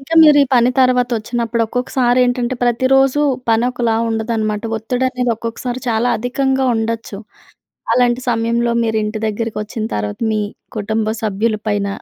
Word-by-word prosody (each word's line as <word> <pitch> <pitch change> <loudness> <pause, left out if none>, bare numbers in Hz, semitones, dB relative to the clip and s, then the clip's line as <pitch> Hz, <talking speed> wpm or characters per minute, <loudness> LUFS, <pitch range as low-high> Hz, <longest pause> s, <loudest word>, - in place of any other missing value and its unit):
ఇంకా 275 +5 -4
మీరు 300 -2 +7
ఈ - - +4
పని 245 +1 +4
తర్వాత 250 -1 +3
వచ్చినప్పుడు 235 +1 -2
ఒక్కొక్కసారి 250 +1 0
ఏంటంటే, 245 0 -1
ప్రతిరోజు 265 +3 +3 0.3
పని 225 +1 +3
ఒకలా 235 -2 0
ఉండదనమాట. 220 -1 -2 0.2
ఒత్తిడి 245 +4 -2
అనేది 250 -1 -1
ఒక్కొక్కసారి 240 +2 -5
చాలా 230 +1 +1
అధికంగా 265 +3 0
ఉండొచ్చు. 225 -2 -3 0.8
అలాంటి 245 0 +2
సమయంలో 235 +1 0
మీరు 220 -1 0
ఇంటి 215 +1 -4
దగ్గరకొచ్చిన 215 0 -3
తర్వాత, 105 0 -3
మీ 215 -1 0 0.4
కుటుంబ 215 +1 -1 0.2
సభ్యుల 215 +1 0
పైన 205 -1 0
235 Hz, 140 wpm, -17 LUFS, 220-250 Hz, 0.8 s, మీరు